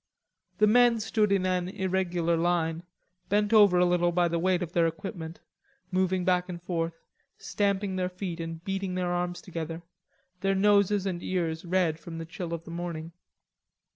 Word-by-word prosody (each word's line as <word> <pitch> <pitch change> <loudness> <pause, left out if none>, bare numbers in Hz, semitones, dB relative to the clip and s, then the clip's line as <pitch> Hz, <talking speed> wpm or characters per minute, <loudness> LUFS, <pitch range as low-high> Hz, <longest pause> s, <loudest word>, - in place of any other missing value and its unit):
The 215 - +5
men 240 +1 +5
stood 215 -1 +1
in 195 -2 +2
an 180 -1 0
irregular 180 -3 0
line, 165 -1 0 0.5
bent 210 +2 +2
over 205 -4 +7
a 180 - +5
little 175 0 +2
by 175 0 +2
the 170 0 -1
weight 180 +1 +1
of 170 - -6
their 170 -1 +3
equipment, 165 0 -6 0.5
moving 185 -1 +1
back 180 -1 +2
and 175 -1 -5
forth, 165 -2 -2 0.4
stamping 200 -1 -1
their 180 -1 0
feet 180 -2 -5
and 165 0 -6
beating 195 -1 -2
their 180 -1 -1
arms 175 0 -2
together, 165 -3 -5 0.6
their 195 +1 +1
noses 200 0 +3
and 180 -3 -2
ears 170 -3 -2
red 170 -3 +1
from 165 0 -8
the 165 - -5
chill 170 +1 -6
of 165 -1 -4
the 165 - -10
morning. 170 -1 -5
180 Hz, 170 wpm, -28 LUFS, 170-190 Hz, 0.6 s, over